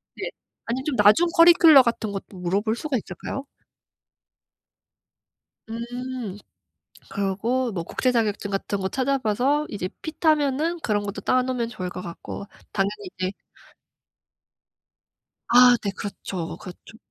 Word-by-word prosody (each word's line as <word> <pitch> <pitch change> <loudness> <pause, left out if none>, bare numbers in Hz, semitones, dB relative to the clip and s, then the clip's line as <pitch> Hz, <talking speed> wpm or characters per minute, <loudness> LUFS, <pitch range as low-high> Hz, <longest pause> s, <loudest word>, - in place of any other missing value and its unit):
네. - - -4 0.4
아니 245 +3 -2
좀 295 -4 -1
나중 210 +11 +5
커리큘럼 335 -5 +8
같은 225 -3 -2
것도 195 -1 -7
물어볼 200 +5 0
수가 295 +1 -2
있잖아요? 240 +10 -7 2.2
음. 240 -2 -5 0.7
그러고 220 +6 -1
뭐 170 -4 -3
국제 255 +8 0
자격증 210 -3 -1
같은 195 +1 -2
거 190 - -1
찾아 270 +3 0
봐서 260 +6 +1
이제 185 -3 -4
핏하면은 310 0 +1
그런 205 -2 0
것도 200 0 -5
따 255 - +2
놓으면 250 -2 -2
좋을 185 -5 -5
것 180 - -7
같고 175 +3 -7 0.3
당연히 200 -1 -2
이제 185 0 -1 2.2
아 245 0 +7
네. 200 - -1
그렇죠, 190 -3 -6
그렇죠. 190 +4 -12
225 Hz, 255 characters per minute, -24 LUFS, 200-260 Hz, 2.2 s, 커리큘럼